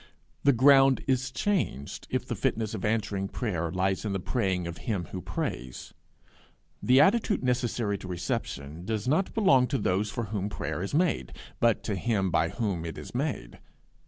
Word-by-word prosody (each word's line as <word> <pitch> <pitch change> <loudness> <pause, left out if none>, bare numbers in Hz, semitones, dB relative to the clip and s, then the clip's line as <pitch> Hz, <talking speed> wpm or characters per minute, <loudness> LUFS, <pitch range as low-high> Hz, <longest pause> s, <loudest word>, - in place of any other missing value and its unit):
The 140 - +6
ground 135 +1 +5
is 130 -1 +1
changed 130 - -2
if - - -1
the - - -3
fitness 110 -1 -1
of 105 - -5
answering 105 -3 0
prayer 90 -7 -2
lies 95 0 0
in 105 -3 -2
the 95 - -1
praying 95 -4 -1
of 85 -1 -6
him 95 -6 -1
who 90 - -5
prays: 65 -6 -5 0.9
the 130 +2 +5
attitude 210 +4 +3
necessary 120 -5 0
to - - -8
reception 85 -3 -4
does 110 +2 -2
not 160 +8 +1
belong 135 - +5
to 135 - 0
those 100 -1 0
for 115 - -3
whom 100 -1 -1
prayer 80 -3 -4
is 100 +9 -3
made, 155 - +1 0.3
but 115 -2 +2
to 105 - -2
him 95 -2 0
by 80 0 +2
whom 100 -8 -2
it 80 -1 -6
is - - -9
made. 125 - -3
105 Hz, 175 wpm, -28 LUFS, 90-130 Hz, 0.9 s, The